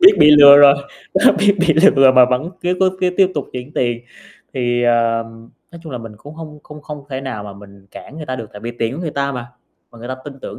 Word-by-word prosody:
Biết 380 Hz, +3 st, +8 dB
bị 150 Hz, -, +6 dB
lừa 145 Hz, -1 st, +8 dB
rồi, 145 Hz, -1 st, +7 dB, 0.4 s
đó 190 Hz, -, +4 dB
biết 205 Hz, 0 st, +2 dB
bị 175 Hz, -3 st, +2 dB, 0.2 s
lừa 135 Hz, -1 st, +5 dB
mà 130 Hz, -1 st, +6 dB
vẫn 130 Hz, +7 st, -2 dB
cứ 180 Hz, +1 st, -2 dB
cố 190 Hz, -, +3 dB
cứ 185 Hz, -, +1 dB
tiếp 190 Hz, -1 st, +3 dB
tục 145 Hz, -, -4 dB
chuyển 125 Hz, +3 st, -8 dB
tiền, 120 Hz, -4 st, -2 dB, 0.5 s
thì, 120 Hz, -2 st, -1 dB
ờm, 115 Hz, -1 st, -2 dB, 0.2 s
nói 170 Hz, -, -13 dB
chung 160 Hz, -5 st, -10 dB
là 125 Hz, -, -5 dB
mình 115 Hz, -2 st, -11 dB
cũng 145 Hz, +8 st, -14 dB
hông 155 Hz, -2 st, -11 dB
không 150 Hz, 0 st, -14 dB
không 150 Hz, -2 st, -10 dB
thể 130 Hz, 0 st, -5 dB
nào 130 Hz, -6 st, -7 dB
mà 100 Hz, -, -9 dB
mình 100 Hz, 0 st, -17 dB
cản 150 Hz, -, -13 dB
người 155 Hz, -2 st, -9 dB
ta 130 Hz, -1 st, -5 dB
được, 115 Hz, -, -8 dB
tại 105 Hz, -, -11 dB
vì 120 Hz, +2 st, -7 dB
tiền 115 Hz, +2 st, -2 dB
của 155 Hz, -, -7 dB
người 165 Hz, -3 st, -4 dB
ta 140 Hz, -1 st, -3 dB
mà, 125 Hz, -2 st, -7 dB, 0.4 s
mà 120 Hz, -, -17 dB
người 120 Hz, +2 st, -10 dB
ta 130 Hz, -, -4 dB
tin 140 Hz, -2 st, -11 dB
tưởng -, -, -9 dB
135 Hz, 265 wpm, -17 LUFS, 120-150 Hz, 0.5 s, Biết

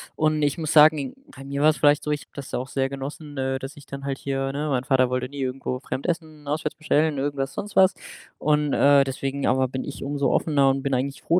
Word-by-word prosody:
Und 155 Hz, 0 st, +1 dB
ich 145 Hz, +1 st, +1 dB
muss 155 Hz, -2 st, -2 dB
sagen, 150 Hz, -3 st, +5 dB, 0.2 s
bei 135 Hz, -, -10 dB
mir 140 Hz, +1 st, -3 dB
war's 155 Hz, 0 st, +5 dB
vielleicht 145 Hz, 0 st, +4 dB
so, 150 Hz, -, -4 dB
ich 145 Hz, -1 st, -1 dB
habe -, -, -29 dB
das 140 Hz, -2 st, -8 dB
auch 125 Hz, +1 st, -2 dB
sehr 135 Hz, 0 st, -1 dB
genossen, 145 Hz, +2 st, -7 dB
äh, 135 Hz, 0 st, -1 dB
dass 135 Hz, +2 st, -7 dB
ich 145 Hz, -, -13 dB
dann 140 Hz, 0 st, -7 dB
halt 135 Hz, -1 st, -2 dB
hier 135 Hz, 0 st, -2 dB
ne, 150 Hz, +2 st, -2 dB
mein 130 Hz, -3 st, 0 dB
Vater 130 Hz, -2 st, +3 dB
wollte 125 Hz, 0 st, -2 dB
nie 140 Hz, -1 st, -6 dB
irgendwo 130 Hz, -1 st, -3 dB
fremd 135 Hz, +5 st, -4 dB
essen, 155 Hz, -4 st, -4 dB
auswärts 150 Hz, +1 st, -2 dB
bestellen, 155 Hz, -1 st, +1 dB
irgendwas, 135 Hz, -1 st, -2 dB
sonst 205 Hz, 0 st, -6 dB
was. 190 Hz, 0 st, +6 dB, 0.5 s
Und, 150 Hz, -1 st, +1 dB
äh, 140 Hz, 0 st, +5 dB
deswegen 135 Hz, +1 st, -3 dB
aber 130 Hz, 0 st, +2 dB
bin 130 Hz, +1 st, -4 dB
ich 140 Hz, -, -7 dB
umso 140 Hz, 0 st, 0 dB
offener 140 Hz, -4 st, +3 dB
und 135 Hz, 0 st, 0 dB
bin 140 Hz, -1 st, -1 dB
eigentlich 135 Hz, +2 st, -2 dB
froh, 170 Hz, -, +3 dB
140 Hz, 240 wpm, -24 LUFS, 135-150 Hz, 0.5 s, was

